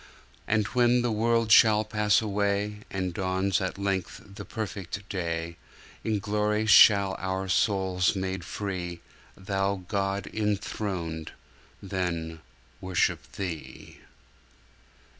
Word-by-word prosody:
And 105 Hz, 0 st, +2 dB
when 125 Hz, 0 st, +3 dB
the 120 Hz, -, 0 dB
world 115 Hz, +1 st, +1 dB
shall 110 Hz, -1 st, +7 dB
pass 105 Hz, 0 st, +2 dB
away, 100 Hz, 0 st, -1 dB
And 95 Hz, -2 st, -3 dB
dawns 95 Hz, +1 st, 0 dB
at 95 Hz, +1 st, -3 dB
length 100 Hz, -2 st, -2 dB
the 100 Hz, 0 st, -8 dB
perfect 100 Hz, -2 st, -6 dB
day, 85 Hz, -2 st, -3 dB, 0.5 s
In 110 Hz, -1 st, 0 dB
glory 105 Hz, +1 st, 0 dB
shall 100 Hz, -2 st, +7 dB
our 95 Hz, 0 st, -2 dB
souls 95 Hz, -1 st, +1 dB
made 95 Hz, -2 st, -3 dB
free, 90 Hz, -2 st, -4 dB, 0.4 s
Thou 95 Hz, -1 st, -2 dB
God 100 Hz, 0 st, -1 dB
enthroned, 95 Hz, -6 st, -3 dB, 0.5 s
Then 85 Hz, -4 st, -3 dB, 0.4 s
worship 90 Hz, -7 st, 0 dB
Thee. 90 Hz, -5 st, -7 dB
100 Hz, 105 wpm, -27 LUFS, 95-105 Hz, 0.5 s, shall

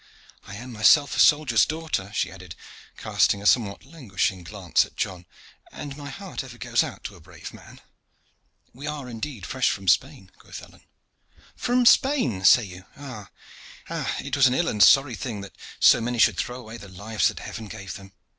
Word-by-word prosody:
I 100 Hz, -, -8 dB
am 125 Hz, +4 st, -9 dB
myself 130 Hz, +6 st, +4 dB
a -, -, -3 dB
soldier's 145 Hz, -7 st, +5 dB
daughter," 155 Hz, -11 st, -3 dB
she -, -, -1 dB
added, 95 Hz, -3 st, -11 dB, 0.4 s
casting 100 Hz, -, +1 dB
a 100 Hz, -, -10 dB
somewhat 105 Hz, -2 st, +2 dB
languishing 105 Hz, -, -3 dB
glance 90 Hz, -1 st, 0 dB
at -, -, -14 dB
John, 90 Hz, -2 st, -4 dB, 0.4 s
"and 140 Hz, -2 st, -8 dB
my 145 Hz, -1 st, -8 dB
heart 185 Hz, +2 st, -7 dB
ever 125 Hz, -2 st, -12 dB
goes 120 Hz, -1 st, +1 dB
out -, -, -8 dB
to 105 Hz, -, -7 dB
a -, -, -16 dB
brave 90 Hz, 0 st, -11 dB
man." -, -, -15 dB, 0.9 s
"We 140 Hz, +5 st, -9 dB
are 150 Hz, -3 st, -5 dB
indeed 115 Hz, -3 st, -6 dB
fresh 130 Hz, -1 st, 0 dB
from 95 Hz, -1 st, -5 dB
Spain," 115 Hz, -, +1 dB
quoth -, -, -11 dB
Alleyne. -, -, -18 dB, 0.7 s
"From 245 Hz, 0 st, +1 dB
Spain, 235 Hz, -, +3 dB
say 120 Hz, -, +7 dB
you? 90 Hz, -1 st, -11 dB
Ah! 130 Hz, -8 st, -9 dB, 0.9 s
it 140 Hz, 0 st, -4 dB
was 135 Hz, -2 st, +5 dB
an 125 Hz, -, 0 dB
ill 175 Hz, +3 st, +1 dB
and 105 Hz, -, -2 dB
sorry 135 Hz, +3 st, +6 dB
thing 110 Hz, -3 st, -5 dB
that 100 Hz, -, -11 dB, 0.2 s
so -, -, +6 dB
many 120 Hz, +1 st, -2 dB
should 110 Hz, -5 st, +4 dB
throw 125 Hz, +7 st, -4 dB
away 115 Hz, -1 st, -10 dB
the 100 Hz, -3 st, -12 dB
lives 100 Hz, +4 st, -1 dB
that -, -, -4 dB
Heaven 110 Hz, -1 st, -8 dB
gave 100 Hz, -1 st, -8 dB
them. 95 Hz, 0 st, -12 dB
115 Hz, 185 wpm, -24 LUFS, 100-140 Hz, 0.9 s, say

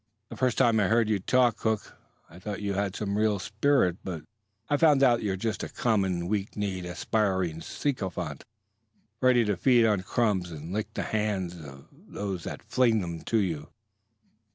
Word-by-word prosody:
The -, -, -8 dB
first 130 Hz, -3 st, 0 dB
time 115 Hz, -4 st, +4 dB
I 100 Hz, -, +3 dB
heard 115 Hz, +1 st, +3 dB
you 105 Hz, -2 st, +2 dB
talk, 125 Hz, +4 st, +2 dB
Hook, 110 Hz, -2 st, -2 dB, 0.3 s
I 85 Hz, -, -14 dB
thought 100 Hz, +2 st, -5 dB
you 100 Hz, -1 st, -1 dB
had 100 Hz, 0 st, -1 dB
some 105 Hz, -1 st, -2 dB
real 105 Hz, -1 st, +2 dB
spirit; 105 Hz, -1 st, +1 dB
but 85 Hz, -5 st, -5 dB, 0.4 s
I've 145 Hz, -, +1 dB
found 150 Hz, -4 st, +5 dB
out 120 Hz, -3 st, +5 dB
that -, -, -7 dB
you're 100 Hz, -3 st, 0 dB
just 110 Hz, +3 st, -2 dB
a -, -, -4 dB
common 95 Hz, -7 st, 0 dB
weak 100 Hz, +1 st, -2 dB
kneed, 95 Hz, -3 st, -2 dB
aspiring 95 Hz, -2 st, -1 dB
sycophant, 105 Hz, -, -3 dB, 0.8 s
ready 125 Hz, -2 st, +4 dB
to 105 Hz, -1 st, +1 dB
feed 120 Hz, +6 st, +4 dB
on 105 Hz, -4 st, +2 dB
crumbs 95 Hz, -3 st, 0 dB
and 80 Hz, +2 st, -7 dB
lick 105 Hz, +1 st, -2 dB
the -, -, -1 dB
hand 105 Hz, -5 st, -1 dB, 0.6 s
that 95 Hz, -4 st, -4 dB
flings 115 Hz, -4 st, +2 dB
them 85 Hz, -2 st, -5 dB
to 115 Hz, -, +1 dB
you." 80 Hz, -7 st, -1 dB
105 Hz, 175 wpm, -28 LUFS, 95-115 Hz, 0.8 s, found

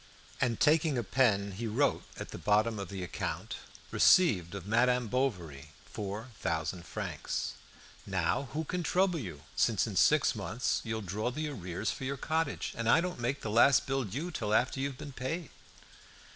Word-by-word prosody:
And 120 Hz, -3 st, +1 dB
taking 155 Hz, -2 st, +4 dB
a 120 Hz, -, 0 dB
pen 100 Hz, -2 st, +2 dB
he 110 Hz, +5 st, -4 dB
wrote 125 Hz, +7 st, +1 dB
at -, -, -6 dB
the -, -, -7 dB
bottom 105 Hz, +1 st, +2 dB
of 100 Hz, -3 st, -5 dB
the 95 Hz, -2 st, -5 dB
account, 90 Hz, -, -4 dB, 0.3 s
"Received 100 Hz, -, +4 dB
of 95 Hz, -2 st, -6 dB
Madame 125 Hz, +3 st, +2 dB
Bovary 85 Hz, -, -2 dB
four 105 Hz, +4 st, -5 dB
thousand 85 Hz, +1 st, -2 dB
francs." -, -, -3 dB, 0.5 s
"Now 135 Hz, -, 0 dB
who 155 Hz, +1 st, -1 dB
can 180 Hz, +3 st, -3 dB
trouble 180 Hz, +1 st, +2 dB
you, 85 Hz, -, -7 dB
since -, -, +2 dB
in -, -, -5 dB
six -, -, +4 dB
months 125 Hz, +3 st, -1 dB
you'll 110 Hz, -1 st, -3 dB
draw 105 Hz, +4 st, -2 dB
the 155 Hz, +4 st, -3 dB
arrears 95 Hz, -5 st, -3 dB
for -, -, -7 dB
your 135 Hz, +1 st, -2 dB
cottage, 160 Hz, +1 st, -1 dB
and 115 Hz, 0 st, -1 dB
I -, -, +7 dB
don't 180 Hz, -2 st, -3 dB
make 125 Hz, +4 st, -1 dB
the 110 Hz, -, -3 dB
last 120 Hz, +4 st, +5 dB
bill 135 Hz, 0 st, 0 dB
due 140 Hz, -, -4 dB
till 110 Hz, -8 st, -1 dB
after 130 Hz, +3 st, +1 dB
you've 135 Hz, -1 st, -2 dB
been 145 Hz, -1 st, -8 dB
paid?" 135 Hz, +5 st, -4 dB
120 Hz, 175 wpm, -31 LUFS, 100-140 Hz, 0.5 s, I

